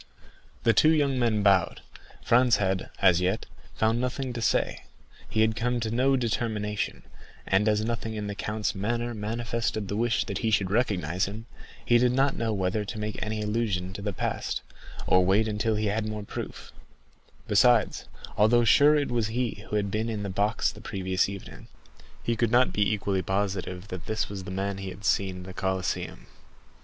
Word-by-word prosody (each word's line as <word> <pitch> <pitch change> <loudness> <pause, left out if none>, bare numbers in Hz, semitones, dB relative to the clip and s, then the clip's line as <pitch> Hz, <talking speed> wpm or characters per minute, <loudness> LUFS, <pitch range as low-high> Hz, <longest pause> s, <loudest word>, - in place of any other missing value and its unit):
The 115 - +4
two 155 - +5
young 145 -4 +2
men 110 -4 +1
bowed. 95 -3 +3 0.4
Franz 120 0 +4
had, 95 -2 -1
as 90 -2 +5
yet, 90 +1 0 0.3
found 110 +2 +1
nothing 125 0 -2
to 120 - -4
say; - - 0 0.5
he 110 - +1
had 110 0 +3
come 120 +1 0
to 110 -1 -2
no 130 +3 +3
determination, 105 - -2 0.4
and 100 +3 +2
as 105 0 +1
nothing 115 -1 -3
in 105 -1 -3
the 100 - -3
count's 105 0 -2
manner 120 +4 -2
manifested 115 0 -2
the 100 - -2
wish 115 +1 +1
that 100 -3 -3
he 115 - 0
should 100 -3 +1
recognize 95 - +1
him, 110 +3 -7 0.4
he 120 0 +5
did 125 0 +3
not 135 +1 +2
know 115 -1 -1
whether 95 +1 0
to 110 +2 -6
make 105 0 -4
any 110 0 -3
allusion 105 -4 -1
to 100 - -7
the 105 0 -2
past, 95 - -3 0.4
or 90 0 +4
wait 100 +4 +3
until 110 +1 0
he 105 +1 -1
had 105 +1 0
more 105 -1 -4
proof; - - -7 0.8
besides, 120 -3 +3 0.3
although 120 +3 +5
sure 145 +6 +6
it 145 -4 0
was 115 -3 +1
he 115 -2 -2
who - - -2
had 100 -2 0
been 110 +2 -1
in 105 -2 -3
the 100 - -3
box 105 +4 +1
the - - -13
previous 95 -1 -1
evening, 70 -11 -9 0.6
he 115 - 0
could 115 0 +1
not 125 +2 +3
be 105 0 +2
equally 100 -2 0
positive 95 -1 -2
that 90 -1 -7
this 110 0 -1
was 100 -2 -6
the - - -6
man 95 +1 -3
he 95 -1 -5
had 95 +2 -9
seen 95 -2 +1
at - - -9
the 95 0 -9
Colosseum. 95 0 -2
105 Hz, 190 wpm, -27 LUFS, 95-115 Hz, 0.8 s, sure